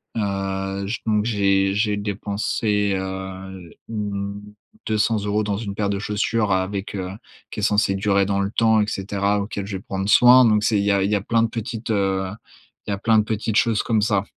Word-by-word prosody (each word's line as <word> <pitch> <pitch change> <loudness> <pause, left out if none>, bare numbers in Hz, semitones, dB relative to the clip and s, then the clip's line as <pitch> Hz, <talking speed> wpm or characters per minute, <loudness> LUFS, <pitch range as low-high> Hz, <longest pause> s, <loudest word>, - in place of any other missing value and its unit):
heu, 95 -1 -2
j 115 - -3
donc, 105 -1 +1
j'ai 100 -3 +2
j'ai 105 0 +1
dépensé, 105 0 -1
heu, 95 -1 -6 0.2
mmh, 100 -2 -4 0.5
200 110 -1 +1
euros 105 +1 0
dans 100 -1 -2
une 100 -3 -5
paire 100 -1 -1
de 100 -1 -1
chaussures 105 0 0
avec, 95 +2 -2
heu, 95 -1 -4 0.4
qui - - -6
est - - -3
censée 105 -2 +2
durer 100 0 +2
dans 100 0 0
le 100 0 0
temps 110 -1 +3
et 105 - 0
cetera, 100 +1 -1
auquel, 100 -1 -4
je 100 -2 -4
vais 95 - -12
prendre 95 +1 -3
soin. 125 +3 +7
Donc, 105 -1 +3
c'est 105 -3 +2
il - - 0
y 100 - +3
a 100 -1 +2
il 100 - 0
y 105 - +3
a 100 - 0
plein 115 +1 +1
de - - +2
petites, 115 0 -5
heu, 95 -2 0 0.6
il - - -5
y - - +1
a - - -2
plein 110 +2 +3
de 105 - +2
petites 110 0 -2
choses 115 -2 +2
comme 110 -2 +1
ça. 100 -2 +1
100 Hz, 215 wpm, -22 LUFS, 100-110 Hz, 0.6 s, soin